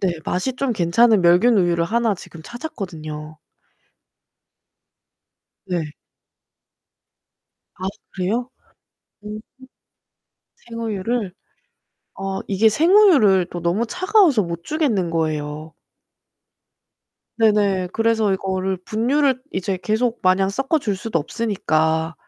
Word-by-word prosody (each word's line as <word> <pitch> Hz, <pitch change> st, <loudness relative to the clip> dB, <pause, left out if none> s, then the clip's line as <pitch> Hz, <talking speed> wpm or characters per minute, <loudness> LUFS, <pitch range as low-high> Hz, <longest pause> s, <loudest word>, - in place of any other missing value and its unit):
네. 190 Hz, -3 st, +1 dB
맛이 185 Hz, +8 st, -2 dB
좀 275 Hz, -2 st, -1 dB
괜찮은 205 Hz, +3 st, +3 dB
멸균 180 Hz, +7 st, +5 dB
우유를 170 Hz, -3 st, +2 dB
하나 230 Hz, +2 st, +1 dB
지금 165 Hz, -2 st, -12 dB
찾았거든요. 160 Hz, -, -7 dB, 2.3 s
네. 170 Hz, -5 st, -3 dB, 1.9 s
아 185 Hz, -, -4 dB, 0.3 s
그래요? 220 Hz, +7 st, -2 dB, 0.7 s
오. 210 Hz, +1 st, -7 dB, 1.3 s
생우유를? 225 Hz, -2 st, -3 dB, 0.9 s
어 195 Hz, 0 st, -3 dB
이게 205 Hz, +3 st, +4 dB
생우유를 295 Hz, -, +5 dB
또 175 Hz, -, -5 dB
너무 175 Hz, +8 st, 0 dB
차가워서 360 Hz, -, +3 dB
못 170 Hz, -1 st, -6 dB
주겠는 245 Hz, -, 0 dB
거예요. 155 Hz, -1 st, -3 dB, 1.7 s
네네. 205 Hz, -4 st, +2 dB
그래서 225 Hz, -2 st, +2 dB
이거를 190 Hz, 0 st, -2 dB
분유를 255 Hz, +4 st, +1 dB
이제 185 Hz, 0 st, -2 dB
계속 230 Hz, +2 st, 0 dB
마냥 190 Hz, +1 st, +3 dB
섞어줄 270 Hz, -2 st, -1 dB
수도 185 Hz, -2 st, -2 dB
없으니까 160 Hz, -4 st, -1 dB
195 Hz, 210 characters per minute, -21 LUFS, 175-235 Hz, 2.3 s, 멸균